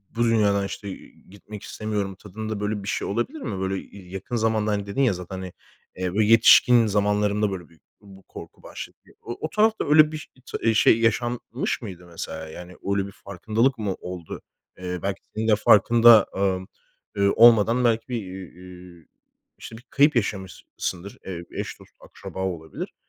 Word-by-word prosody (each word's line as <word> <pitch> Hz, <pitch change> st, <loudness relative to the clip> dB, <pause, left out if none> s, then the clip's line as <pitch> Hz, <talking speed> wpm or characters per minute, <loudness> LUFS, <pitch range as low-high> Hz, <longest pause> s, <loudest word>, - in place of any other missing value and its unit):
bu 120 Hz, -, +1 dB
dünyadan 105 Hz, -4 st, +2 dB
işte, 100 Hz, +1 st, -6 dB
eee, 95 Hz, -, -10 dB, 0.2 s
gitmek 100 Hz, +1 st, -11 dB
istemiyorum 105 Hz, -3 st, -4 dB
tadında 110 Hz, +2 st, -6 dB
böyle 105 Hz, 0 st, -3 dB
bir -, -, -8 dB
şey -, -, -2 dB
olabilir 120 Hz, -, -2 dB
mi? 100 Hz, -, -4 dB
Böyle 95 Hz, +1 st, -4 dB
ya 95 Hz, -2 st, -13 dB
yakın 95 Hz, +5 st, -5 dB
zamanda 110 Hz, -2 st, +1 dB
hani 100 Hz, -1 st, -1 dB
dedin 100 Hz, +7 st, -2 dB
ya 125 Hz, -6 st, +3 dB
zaten 90 Hz, +1 st, -7 dB
hani, 95 Hz, -1 st, -7 dB, 0.4 s
eee, 90 Hz, -1 st, -3 dB
bu 105 Hz, -, +2 dB
yetişkin 115 Hz, +2 st, +6 dB
zamanlarında 105 Hz, 0 st, +1 dB
böyle 90 Hz, -3 st, -7 dB
bü 85 Hz, -, -22 dB, 0.2 s
bu 95 Hz, -2 st, -16 dB
korku -, -, -12 dB
başladı. -, -, -9 dB, 0.2 s
O 120 Hz, -, -7 dB
o 155 Hz, -, -3 dB
tarafta 220 Hz, +4 st, +1 dB
öyle 155 Hz, 0 st, +6 dB
biş 155 Hz, -1 st, -7 dB, 0.2 s
t -, -, -5 dB
eee, 115 Hz, -, +4 dB
şey 110 Hz, +1 st, +4 dB
yaşanmış 120 Hz, +3 st, -1 dB
mıydı 90 Hz, -6 st, -9 dB
mesela? 80 Hz, -2 st, -7 dB
Yani 90 Hz, +3 st, -10 dB, 0.2 s
öyle 100 Hz, -1 st, 0 dB
bir -, -, -10 dB
farkındalık 110 Hz, +7 st, -1 dB
mı 105 Hz, -4 st, -2 dB
oldu? 90 Hz, -3 st, -8 dB, 0.4 s
Eee, 90 Hz, -1 st, -5 dB
belki 100 Hz, 0 st, -3 dB
senin 110 Hz, +1 st, -2 dB
de 110 Hz, -, +5 dB
farkında, 115 Hz, +1 st, +6 dB
ımm, 95 Hz, -1 st, -1 dB, 0.5 s
ııı, 100 Hz, 0 st, +3 dB
olmadan 115 Hz, +1 st, +6 dB
belki, 115 Hz, -1 st, +1 dB
bir, 125 Hz, -, -3 dB
iii, 95 Hz, -1 st, -9 dB
iii, 90 Hz, -2 st, -14 dB, 0.5 s
işte 110 Hz, -, -10 dB
bir 120 Hz, -, -15 dB
kayıp 145 Hz, +1 st, +4 dB
yaşamışsındır. 95 Hz, -2 st, -4 dB
Eee, 90 Hz, -3 st, -6 dB
eş, -, -, -6 dB
dost, -, -, -17 dB
akraba -, -, -11 dB
olabilir. 80 Hz, -4 st, -6 dB
100 Hz, 175 wpm, -24 LUFS, 95-115 Hz, 0.5 s, yetişkin